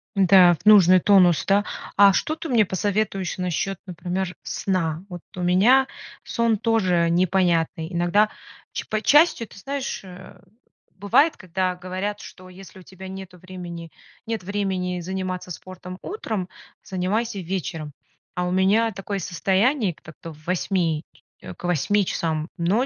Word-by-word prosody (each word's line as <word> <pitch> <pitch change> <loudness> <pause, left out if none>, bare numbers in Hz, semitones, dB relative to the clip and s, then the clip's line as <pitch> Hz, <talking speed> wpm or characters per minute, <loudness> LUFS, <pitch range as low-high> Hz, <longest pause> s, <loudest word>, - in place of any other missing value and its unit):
Да. 185 -2 +6
В 170 - -9
нужный 185 -4 +7
тонус, 180 -7 +5
да? 200 +1 +2 0.3
А 200 -1 +7
что 310 - 0
ты 325 - -7
мне 235 -6 +3
посоветуешь 195 0 -1
насчет, 180 +1 -2
например, 180 +1 -4
сна? 170 -4 -2
Вот 175 -2 -8
у 180 - -5
меня 225 +10 +4 0.4
сон 230 -2 0
тоже 185 -7 +2
непонятный. 175 -1 +1
Иногда 175 +5 +2 0.4
ч - - -5
по 215 0 -1
частью, 295 -2 +4
ты - - -16
знаешь, 275 +4 -4
э, 180 0 -12 0.6
бывает, 205 - +3
когда 185 0 -2
говорят, 185 +3 -4
что 185 -1 -12
если 190 +1 -13
у - - -14
тебя 190 +1 -11
нету 190 -1 -9
времени, 175 -2 -9 0.3
нет 225 -2 -3
времени 185 -2 -2
заниматься 185 0 -4
спортом 185 +1 -9
утром, 220 - -4 0.3
занимайся 200 +4 -2
вечером. 165 -4 -4 0.4
А 180 -1 -1
у - - -2
меня 200 +5 +3
такое 195 +1 -4
состояние, 195 - +1
так-то 160 +1 -11
в 155 +1 -20
8, 175 -3 0 0.5
к - - -16
8 185 +4 +1
часам 160 -3 -2
но 190 +9 +1
185 Hz, 140 wpm, -23 LUFS, 180-205 Hz, 0.6 s, нужный